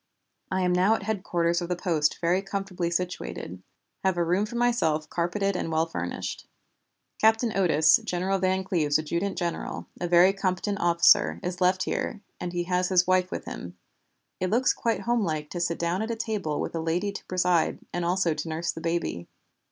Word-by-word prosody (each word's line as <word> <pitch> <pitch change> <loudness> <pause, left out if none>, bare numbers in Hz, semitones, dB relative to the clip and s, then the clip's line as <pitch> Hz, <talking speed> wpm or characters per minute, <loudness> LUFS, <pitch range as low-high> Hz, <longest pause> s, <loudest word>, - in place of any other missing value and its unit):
"I 190 0 0
am 180 -1 +2
now 185 +5 +4
at 195 - -5
headquarters 175 -5 0
of 175 - -4
the 180 - 0
post 160 -5 +1
very 175 +3 +2
comfortably 190 -3 -3
situated; 170 - -4 0.4
have 190 -2 +1
a 175 - +2
room 180 +5 +1
for 235 - -8
myself 200 -11 +1
carpeted 195 +3 0
and 165 - -2
well 160 0 +2
furnished. 90 - -5 0.7
Captain 225 +1 +3
Otis, 160 -5 +5
General 190 -1 -1
Van 190 0 +1
Cleve's 160 -6 +1
adjutant 170 +5 -2
general, 175 -2 -3
a 175 - -1
very 175 +2 +6
competent 195 +1 -1
officer, 170 - +4
is 180 0 -4
left 185 +1 +3
here, 205 - -3 0.2
and 180 - -4
he 175 0 -1
has 180 0 0
his 180 -2 +4
wife 185 0 +2
with - - -5
him. 90 +1 -8 0.6
It 185 - 0
looks 245 +5 +3
quite 230 -1 -1
homelike 165 -11 -1
to 175 - -4
sit 170 -1 0
down 170 +3 -1
at 220 - -3
a 230 - -1
table 210 -9 -2
with - - -3
a 165 - -2
lady 175 +5 -1
to 200 - -8
preside, 180 -2 +1 0.2
and 175 - -1
also 175 -1 +1
to 155 +2 -5
nurse 160 +2 -1
the 165 - -8
baby. 165 - -2
180 Hz, 190 wpm, -26 LUFS, 170-195 Hz, 0.7 s, very